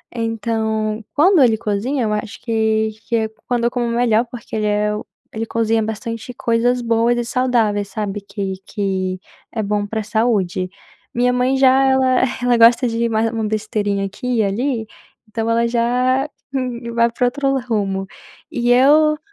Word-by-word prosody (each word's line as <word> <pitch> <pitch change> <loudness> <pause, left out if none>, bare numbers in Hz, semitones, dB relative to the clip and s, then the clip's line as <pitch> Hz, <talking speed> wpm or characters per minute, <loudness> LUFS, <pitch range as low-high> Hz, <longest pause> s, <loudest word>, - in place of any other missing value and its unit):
Então, 220 -1 -2
quando 345 +2 +5
ele 225 -3 +3
cozinha, 220 +6 -1
eu 215 - 0
acho 210 0 -4
que 220 -1 +1 0.2
que 235 - +1
é 220 -1 0 0.2
quando 240 -1 0
eu 240 - +2
como 240 -1 -1
melhor, 235 -1 +2
porque 235 -2 -8
ele 215 -1 -1
é 210 0 +1
o 210 - -6 0.3
ele 225 +1 -3
cozinha 225 0 +1
bastante 225 +2 -5
coisas 240 +1 +1
boas 230 +1 +2
e 240 - 0
saudáveis, 230 -5 +1
sabe 205 0 -4
que 200 -1 -4
que 190 -3 -2 0.3
é 220 - -2
bom 205 0 -1
para 220 +2 -3
a - - -3
saúde. 205 -5 0 0.4
Minha 245 +1 +2
mãe 250 +2 +1
já 265 0 +5
ela 265 -1 +3 0.2
ela 245 -1 +3
gosta 235 +2 +6
de 230 0 0
uma 225 0 +1
uma 225 -1 -2
besteirinha 210 -2 -1
aqui 240 +5 -3
e 220 - +3
ali, 225 +3 -1 0.4
então 225 +1 -3
ela 230 +1 +2
já 250 +3 +1 0.7
vai 235 0 +3
pra 245 - 0
outro 275 +1 0
rumo 200 -6 -2 0.4
e 240 0 +1
eu. 300 +4 +5
230 Hz, 170 wpm, -19 LUFS, 215-245 Hz, 0.7 s, gosta